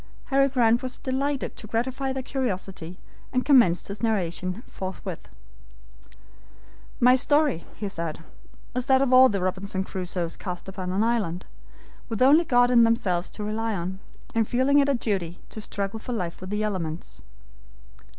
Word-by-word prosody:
Harry 275 0 +5
Grant 240 -3 +3
was 255 -1 -5
delighted 275 +1 -2
to 215 - -8
gratify 260 +4 -1
their 265 0 -3
curiosity, 190 -9 -4 0.3
and 255 0 0
commenced 240 - +5
his 200 +1 -7
narration 185 -2 -1
forthwith. 185 -2 -7 1.7
"My 250 +1 +6
story," 290 - +2
he 205 - -4
said, 165 -4 -5 0.5
"is 250 +1 -2
that 265 -1 +5
of 260 -2 +1
all 260 0 +8
the 200 -2 -1
Robinson 190 +2 -2
Crusoes 180 -3 -3
cast 180 -1 -6
upon 185 -1 -5
an 195 +3 +1
island, 210 -7 0 0.6
with 225 +1 +1
only 300 +6 +6
God 245 -2 +4
and 235 -1 +6
themselves 185 -6 +1
to 210 - -7
rely 220 +1 -1
on, 185 +1 -4 0.3
and 225 -2 +1
feeling 265 +4 +3
it 280 0 +3
a 280 - +3
duty 190 -8 -2
to 215 - -7
struggle 200 +1 -4
for 245 - -5
life 180 -7 -4
with 185 - -7
the 210 +1 -1
elements. 175 -6 -4
215 Hz, 160 wpm, -25 LUFS, 185-255 Hz, 1.7 s, all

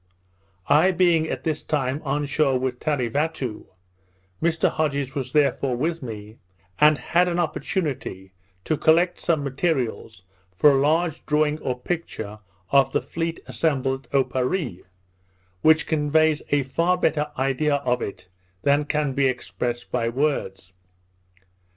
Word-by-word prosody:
I 160 +5 +5
being 170 -3 +2
at - - -4
this 155 -2 -1
time 140 -1 -1
on 145 0 -1
shore 140 -2 +1
with 125 -1 -3
Tarevatoo, 140 -2 -2 0.7
Mr 170 0 +2
Hodges 140 -4 -1
was 130 -2 -4
therefore 140 -3 +2
with 165 +5 -1
me, 110 -3 -8 0.4
and 150 0 +6
had 175 +3 +2
an 175 -1 -1
opportunity 140 - -3 0.3
to 155 - 0
collect 170 +4 +3
some 160 -4 0
materials 130 - -2 0.3
for 150 - +6
a 135 -1 +2
large 160 +2 +1
drawing 150 0 +1
or 125 -4 -3
picture 115 -9 -5 0.3
of 140 -1 +4
the - - +2
fleet 165 0 -4
assembled 135 -4 -1
at - - -35
Oparree, 130 - 0 0.8
which 160 0 +5
conveys 155 0 +2
a 145 -1 +2
far 170 +7 +1
better 150 -4 0
idea 135 +3 +1
of 130 -3 0
it 100 - -6 0.4
than 145 +1 +3
can 150 -2 -1
be 140 0 +2
expressed 120 -1 -3
by 115 -2 0
words. 115 -9 -2
145 Hz, 135 wpm, -24 LUFS, 130-160 Hz, 0.8 s, and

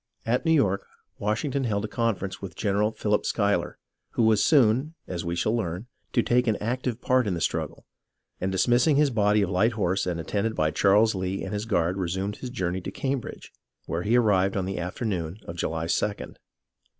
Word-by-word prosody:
At 120 +8 0
New 160 - +3
York, 100 -10 +2 0.3
Washington 125 +6 -1
held 105 -2 0
a - - -3
conference 105 -3 -2
with 95 -4 -7
Gen 100 -1 -1
eral 105 +2 +1
Philip 105 -1 +1
Schuyler, 100 -5 0 0.4
who 120 - +1
was 110 -2 +4
soon, 135 +2 +3
as 90 -2 -4
we 85 0 -2
shall 110 +6 +1
learn, 95 -2 -3 0.3
to 120 - +3
take 125 0 +2
an 110 - +3
active 120 +2 -2
part 130 -3 +2
in 95 - 0
the - - -3
struggle, - - -2 0.5
and 95 +1 -1
dismissing 120 +9 +3
his 145 -1 +3
body 105 -2 +3
of 95 - -2
light 110 +6 +2
horse 95 -3 0
and 85 -2 -2
attended 105 +6 -1
by 80 0 +1
Charles 105 +5 +4
Lee 95 0 -3
and 95 - -5
his 105 +1 -2
guard 90 -4 +1
resumed 95 +2 -2
his 125 - -6
journey 95 -6 -2
to - - -5
Cambridge, 135 -2 -4 0.3
where 85 - -2
he 110 +6 +2
arrived 100 -4 +3
on 95 - -1
the 95 0 -3
afternoon 90 -1 -3
of 85 - -7
July 80 -1 -2
2d. 100 +4 -2
105 Hz, 200 wpm, -26 LUFS, 95-115 Hz, 0.5 s, was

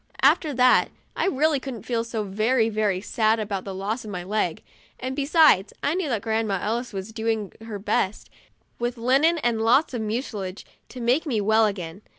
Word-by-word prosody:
After 310 - +4
that 250 0 +5 0.3
I - - 0
really 305 -3 +2
couldn't 260 -4 -7
feel 235 -2 -1
so 230 -2 -3
very 220 +4 +1
very 210 -4 0
sad 220 +1 +1
about 200 -3 -3
the 195 -1 -5
loss 205 +6 -3
of 215 - -8
my 180 -3 -5
leg, 185 -3 -2 0.4
and 260 +1 -4
be 280 -1 -2
sides 300 - +5
I 290 - +1
knew 355 -4 -1
that 225 -5 -1
Grandma 220 -3 0
Ellis 235 +5 -2
was 195 +2 -6
doing 220 -2 -2
her 220 -2 -6
best, 200 0 -1 0.5
with 240 +1 -2
linen 270 +8 +3
and 240 -6 0
lots 255 +7 +3
of 240 - -2
mucilage, 210 -4 -4 0.2
to 250 - -8
make 250 +8 +1
me 235 -7 0
well 220 +2 +4
again. 185 -2 -5
225 Hz, 190 wpm, -24 LUFS, 205-255 Hz, 0.5 s, that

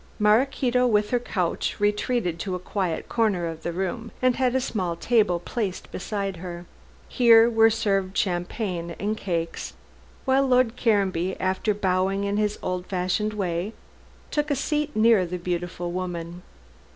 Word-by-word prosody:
Maraquito 250 +3 +3
with 210 -2 +2
her 245 - +3
couch 185 -7 -2
retreated 205 -3 0
to 185 +1 -3
a - - -4
quiet 180 -2 -2
corner 210 -7 +1
of 165 -1 -5
the 170 - -3
room, 190 +6 -3
and 255 -1 +3
had 255 -1 +1
a - - +4
small 185 -8 -2
table 210 -2 +2
placed 195 +1 -4
beside 195 -1 -3
her. 175 0 -7 0.4
Here 230 -2 +6
were 225 -1 +5
served 195 -4 0
champagne 175 -1 -2
and 210 +2 -1
cakes, 170 -5 -3 0.5
while 270 0 +3
Lord 250 -2 +3
Caranby, 195 -6 +1
after 190 +3 0
bowing 190 0 0
in 200 0 -1
his 210 0 0
old 180 0 -3
fashioned 185 +3 -1
way, 185 +1 -2 0.6
took 295 0 0
a 285 - +2
seat 295 +2 -1
near 220 -2 +5
the 180 +1 -4
beautiful 175 0 -3
woman. 175 -1 -5
200 Hz, 150 wpm, -25 LUFS, 180-230 Hz, 0.6 s, Here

